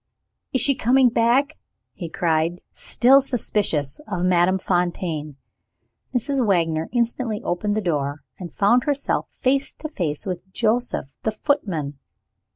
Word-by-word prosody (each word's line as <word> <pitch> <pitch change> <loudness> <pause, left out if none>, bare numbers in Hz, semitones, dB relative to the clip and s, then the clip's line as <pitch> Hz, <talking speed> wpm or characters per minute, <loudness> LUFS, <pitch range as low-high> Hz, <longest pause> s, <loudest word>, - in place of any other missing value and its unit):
"Is 260 - +3
she 275 +3 +7
coming 255 +1 +3
back?" 245 +6 +1 0.3
he 170 -3 -7
cried, 165 +1 0
still 265 +3 +4
suspicious 205 - -1
of 180 -4 -2
Madame 180 +1 +3
Fontaine. 175 -5 -2 0.7
Mrs. 265 +1 0
Wagner 165 -6 +1
instantly 235 -2 -1
opened 205 +4 -1
the - - 0
door, 145 -5 -2 0.2
and 175 -3 -7
found 235 - +2
herself 285 -2 -1
face 270 +2 0
to 310 - -7
face 170 - -3
with 185 0 -6
Joseph 230 - -1
the - - 0
footman. 185 - -2
200 Hz, 130 wpm, -22 LUFS, 170-245 Hz, 0.7 s, she